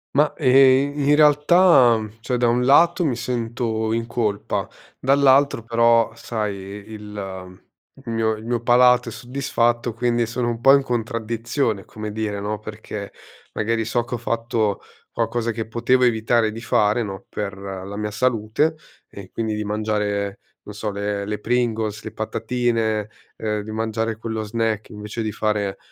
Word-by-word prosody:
Ma, 150 +1 +4
e 135 +2 +5
ehm, 145 -1 -1
in 150 - +6
realtà, 150 -3 +5
mhmm, 110 0 -7
cioè 125 +1 -1
da 120 - +2
un 120 +1 +2
lato 170 +7 +5
mi 135 -7 +1
sento 115 -2 -2
in 115 0 -1
colpa, 110 -4 -2 0.3
dall'altro 140 -2 +4
però 115 0 +3
sai 110 -3 -3
i - - -9 0.3
il 95 -3 -8 0.5
il 115 - -4
mio 110 -1 +1
il 110 +1 -11
mio 120 0 -1
palato 125 0 +4
è - - -8
soddisfatto, 120 -2 -1
quindi 120 -1 +1
sono 120 +1 -2
un 115 0 -4
po' 135 +2 +7
in 140 - +2
contraddizione 115 -2 -2
come 110 -1 -7
dire 105 -2 -3
no, 105 0 -3
perché 105 -1 -7 0.4
magari 115 +1 -1
so 120 +1 0
che 120 - -8
ho 120 - 0
fatto 115 -2 -1 0.3
qualcosa 120 -1 -1
che 110 0 -4
potevo 120 +3 +2
evitare 115 -1 +2
di 115 +1 -8
fare 105 -1 +2
no, 95 -3 -7
per 100 -2 -4
la 95 0 -7
mia 105 0 -3
salute, 120 +6 +1 0.3
e 100 -2 -11
quindi 110 -2 -2
di 105 - -3
mangiare, 105 -1 -2 0.2
non 105 - -10
so, 105 0 -3
le 100 0 -3
le 105 +1 -3
Pringles, 110 -2 -1
le - - -6
patatine, 110 -2 -1 0.3
ehm, 105 -1 -2
di 110 +1 -8
mangiare 110 0 -2
quello 110 -1 -4
snack 110 0 -2
invece 105 +1 -6
di 110 - -2
fare 105 -2 -1
115 Hz, 165 wpm, -22 LUFS, 105-120 Hz, 0.5 s, po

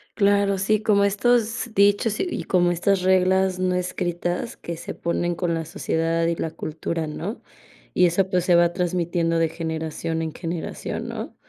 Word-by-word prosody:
Claro, 200 -1 +3
sí, 215 +2 +1
como 205 -2 +3
estos 225 +3 +1
dichos 205 +2 +3
y - - 0
y - - -3
como 175 -1 +2
estas 185 +2 +1
reglas 185 0 +3
no 185 0 +1
escritas 180 +3 -2
que 170 - -6
se - - -6
ponen 175 0 -1
con 175 -1 -1
la 165 0 -2
sociedad 165 -1 -1
y 170 - +1
la 160 - -3
cultura, 160 +1 -4
¿no? 150 - -5 0.5
Y - - +5
eso, 185 +2 +1
pues, 180 -2 +1
se 180 - +4
va 170 0 +4
transmitiendo 175 -2 0
de 165 0 +2
generación 160 0 -3
en 160 -1 -3
generación, 165 -1 -5
¿no? - - -6
175 Hz, 170 wpm, -23 LUFS, 165-195 Hz, 0.5 s, Y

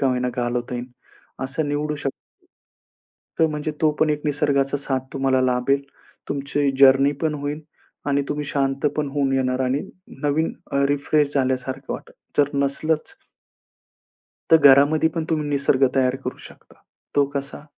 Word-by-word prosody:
का 135 - +2
होईना 125 0 0
घालवता 120 0 -2
येईल. 120 +1 -4 0.6
असं 145 +3 -2
निवडू 150 +1 -1
शकतो. 135 -2 -3 1.3
तो 160 - +5
म्हणजे 150 0 -3
तो 155 -1 +4
पण 155 - +3
एक 150 0 -2
निसर्गाचा 145 -1 +1
साथ 135 -1 -1
तुम्हाला 135 -1 +1
लाभेल. 130 +2 +1 0.5
तुमची 140 0 0
जर्नी 135 +1 +6
पण 155 -1 +1
होईल 145 +1 -4 0.5
आणि 140 0 +2
तुम्ही 150 0 -2
शांत 135 0 -1
पण 150 -2 0
होऊन 140 -2 +1
येणार 130 -1 0
आणि 130 +2 0 0.4
नवीन 150 +3 +1 0.4
रिफ्रेश 145 0 +1
झाल्यासारखं 130 0 -1
वाटतं. - - -8 0.3
जर 140 -1 +4
नसलंच 155 - -1 1.4
तर 160 - +9
घरामध्ये 145 +2 +6
पण 165 -1 -1
तुम्ही 155 -2 0
निसर्ग 140 -1 +2
तयार 130 0 +2
करू - - -4
शकता. - - -19 0.4
तो 140 - +5
कसा? 140 +1 -4
140 Hz, 145 wpm, -22 LUFS, 135-150 Hz, 1.4 s, तर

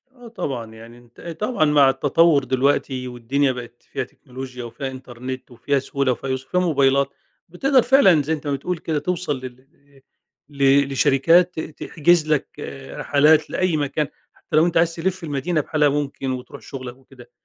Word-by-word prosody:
آه، 245 -1 -13
طبعًا 125 - -5
يعني 115 +2 -13
أنتَ 120 -1 -18 0.2
طبعًأ 210 -5 +1
مع 145 -2 +5
التطور 145 +2 +3
دلوقتي 130 0 0
والدنيا 130 +3 0
بقت 120 -1 -9
فيها - - -2
تكنولوجيا 125 -1 -9
وفيها 130 +3 -6
إنترنت 130 0 -8
وفيها 140 +3 -1
سهولة 135 0 -1
وفيها 130 +2 -4
يُسر 130 0 -3
وفيها 180 - +1
موبايلات، 140 -5 +2 0.4
بتقدر 260 - +3
فعلًا 235 - +5
زي 155 +3 -1
أنتَ 150 -2 -5
ما 145 - 0
بتقول 170 +6 -3
كده 155 -2 -2
توصل 170 -2 -2
لل 130 -1 -9
إإ 140 0 -26 0.5
ل 140 -1 +3
لشركات 165 +6 +3
ت 155 -1 -7
تحجز 170 0 +2
لَك 150 - -3 0.3
رحلات 150 +2 +3
لأي 185 -4 0
مكان، 150 +1 -1 0.3
حتى - - -7
لو 155 +2 +5
أنتَ 175 -1 0
عايز 165 0 +2
تلف 185 +2 -2
المدينة 155 +2 -1
بحالها 150 0 +2
ممكن 140 -2 -2
وتروح 125 -1 -7
شغلَك 130 -2 -8
وكده. 130 -2 -17
140 Hz, 170 wpm, -22 LUFS, 130-160 Hz, 0.5 s, مع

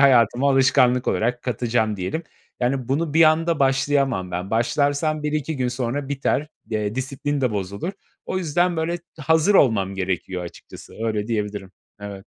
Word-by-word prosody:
hayatıma 125 0 +5
alışkanlık 130 -2 +4
olarak 120 +2 0
katacağım 115 -3 0
diyelim. 95 - -3 0.4
Yani, 125 0 0
bunu 150 +3 -1
bir 165 - +6
anda 165 +1 +3
başlayamam 135 -7 +1
ben. 90 +2 -4
Başlarsam 145 +6 +1
1-2 150 0 -2
gün 125 -1 0
sonra 125 +3 -3
biter, 140 +1 0 0.2
de 105 -1 -2
disiplin 140 +2 -2
de 130 -2 +1
bozulur. 100 - -3 0.3
O 185 - -1
yüzden, 175 +1 +1
böyle, 165 +2 -1 0.2
hazır 160 +6 +3
olmam 100 - +3
gerekiyor 95 -1 -3
açıkçası. 85 - -12
Öyle 105 -2 -1
diyebilirim. 105 -4 -3 0.3
Evet. 100 -1 -8
130 Hz, 145 wpm, -23 LUFS, 105-145 Hz, 0.4 s, bir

